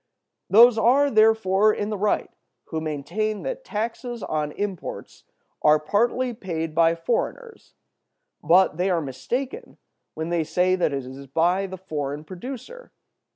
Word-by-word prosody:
Those 230 +2 +7
are, 275 +5 +4
therefore, 215 -2 +4
in 210 0 -3
the 210 - -2
right 210 +1 0 0.4
who 160 -1 -3
maintain 160 +8 -3
that - - -4
taxes 230 - -4
on 150 -1 -2
imports 200 -4 -6 0.4
are 150 0 +5
partly 235 +10 0
paid 165 -7 -4
by 165 +1 +4
foreigners; 420 - -4 0.7
but 180 -2 +4
they 180 +2 +1
are 175 -2 +2
mistaken 245 - -5 0.4
when 160 +1 -4
they 170 -1 +1
say 180 +3 +1
that 180 -4 0
it 135 -2 -3
is 135 +2 -10
by 175 +7 +1
the 190 0 -8
foreign 150 -5 -4
producer. 255 - -9
190 Hz, 140 wpm, -24 LUFS, 160-230 Hz, 0.7 s, Those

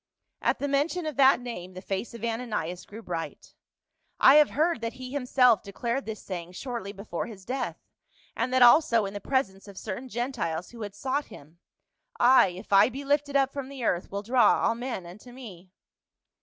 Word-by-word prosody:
At - - +1
the 285 - -2
mention 295 +5 0
of 305 -3 -3
that 270 -2 +6
name 185 -7 -7
the - - -6
face 195 +5 -4
of 230 - -10
Ananias 215 -7 -3
grew 220 +3 -10
bright. 170 -4 -6 0.3
" - - -48
I - - +9
have 300 -1 +6
heard 315 -3 0
that 230 0 -3
he 255 -1 -9
himself 250 -5 +3
declared 235 +6 -3
this 220 -2 -6
saying 180 -2 -6
shortly 235 -1 -5
before 200 -1 -5
his 200 -5 -11
death, 255 +2 -3 0.6
and 240 +3 -1
that 255 -1 +5
also 240 -4 +6
in 195 - -5
the 205 - -6
presence 200 -6 -1
of 200 -2 -12
certain 225 +7 -6
Gentiles 230 -9 -3
who 235 -1 -11
had 205 -1 -6
sought 265 +6 -2
him, 155 +4 -15 0.3
* - - -30 0.2
I, - - +6
if 185 +3 -7
I 200 +3 +7
be 275 +3 -7
lifted 285 0 0
up 275 -1 +2
from 275 -2 -5
the 275 -3 -7
earth, 180 -5 0
will 200 +1 -4
draw 245 +3 +4
all 230 - +3
men 235 -6 -5
unto 205 +8 -12
me.' 200 -8 -11
235 Hz, 200 wpm, -27 LUFS, 195-265 Hz, 0.6 s, I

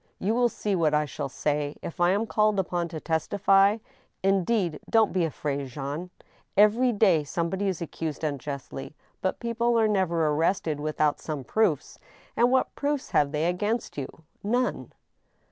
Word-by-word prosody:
You 205 +4 0
will 245 0 +3
see 210 -3 -2
what 155 -4 +2
I 150 0 +2
shall 140 0 -5
say, 145 +1 -2
if 170 - -7
I 175 - +5
am 205 +4 +1
called 215 -2 +2
upon 175 -2 -1
to 160 -1 -6
testify. 195 +5 +3 0.5
Indeed, 195 -3 +1
don't 225 -2 +3
be 180 -3 +2
afraid, 140 -3 -3
Jean. 145 +7 -5 0.5
Every 220 +5 +5
day 195 -8 +3
somebody 170 +6 -2
is 180 -3 -2
accused 160 -1 -5
unjustly; 140 -1 -5 0.3
but 185 - -1
people 235 0 +1
are 220 - +4
never 180 -6 +1
arrested 155 0 0
without 155 0 0
some 150 -4 -5
proofs, 190 - 0 0.4
and 240 +1 +4
what 260 +1 +2
proofs 285 -1 -2
have 145 -1 +3
they 150 +1 0
against 205 +7 -1
you? 140 -2 -3 0.4
None." 245 +5 -1
175 Hz, 160 wpm, -27 LUFS, 150-210 Hz, 0.5 s, I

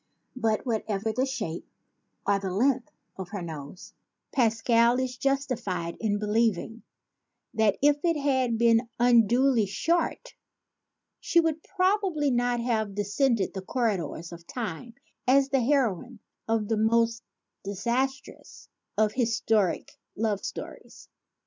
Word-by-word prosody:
But 225 -2 0
whatever 220 -2 -1
the 260 +3 0
shape 175 -11 -4 0.6
or 200 -1 +2
the 195 -1 -4
length 245 +5 +1 0.3
of 190 -2 -6
her 205 -4 -5
nose, 155 +1 -9 0.4
Pascal 235 0 +3
is 255 -1 -2
justified 245 -11 -2
in 210 -2 0
believing 220 +1 0 0.7
that 220 -3 +2
if 290 0 +3
it 335 -2 +2
had 260 -5 +1
been 230 0 +3
unduly 240 0 +4
short 330 - -1 0.9
she 340 - +2
would 320 -1 0
prob 390 +3 +1
ably 305 -7 0
not 245 0 +1
have 220 -4 -1
descended 205 +1 +1
the 190 - -5
corridors 190 - -2
of 170 0 -11
time 230 0 -6 0.3
as 270 +1 +4
the 270 -2 +2
heroine 245 - 0 0.3
of 225 -2 0
the 225 - 0
most 230 +1 +2 0.4
disastrous 240 +8 -3 0.3
of 215 0 +2
historic 225 -5 0 0.2
love 210 -2 -1
stories. - - -8
230 Hz, 125 wpm, -27 LUFS, 205-260 Hz, 0.9 s, unduly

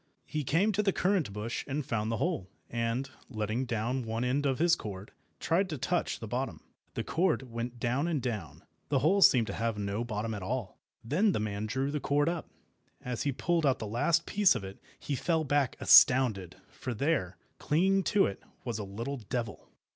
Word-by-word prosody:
He 155 -1 -3
came 170 - +2
to 210 +1 +1
the 200 -2 +2
currant 180 - +1
bush 105 +4 -4
and 145 0 -2
found 110 -2 -1
the 115 - -1
hole, 95 -1 -1 0.2
and, 115 +3 -1 0.2
letting 110 +1 -2
down 120 +2 -1
one 115 +1 -2
end 135 +3 +1
of 135 -2 0
his 170 +2 +4
cord, 100 -1 -8 0.3
tried 185 +3 +1
to 155 - -3
touch - - -1
the - - -6
bottom. - - -3 0.3
The - - -2
cord 170 -4 +1
went 120 +1 -5
down 125 +7 0
and 165 -4 0
down—the 105 - -4
hole 175 +9 +3
seemed 125 -10 +6
to - - -5
have 115 -1 -1
no 100 +2 -2
bottom 110 -1 -3
at 105 - -5
all. 115 0 -4 0.2
Then 180 - +2
the - - 0
man 105 0 -3
drew 135 +5 -1
the 150 - -1
cord 145 +2 +1
up. 170 -1 -4 0.6
As 125 -2 -3
he 145 - +1
pulled 170 +5 0
out 135 -3 +3
the 110 - -5
last 120 +10 +1
piece 205 -2 +4
of - - -3
it, 95 0 -8 0.2
he 145 - -4
fell 160 +4 +1
back 145 -3 +1
astounded, 125 - +6 0.2
for 125 -2 -5
there, 105 - 0 0.2
clinging 190 +6 +2
to 205 - +4
it, 100 - -4 0.2
was 115 -3 -3
a - - -3
little 115 +8 -5
devil. 115 - -5
125 Hz, 200 wpm, -30 LUFS, 110-150 Hz, 0.6 s, seemed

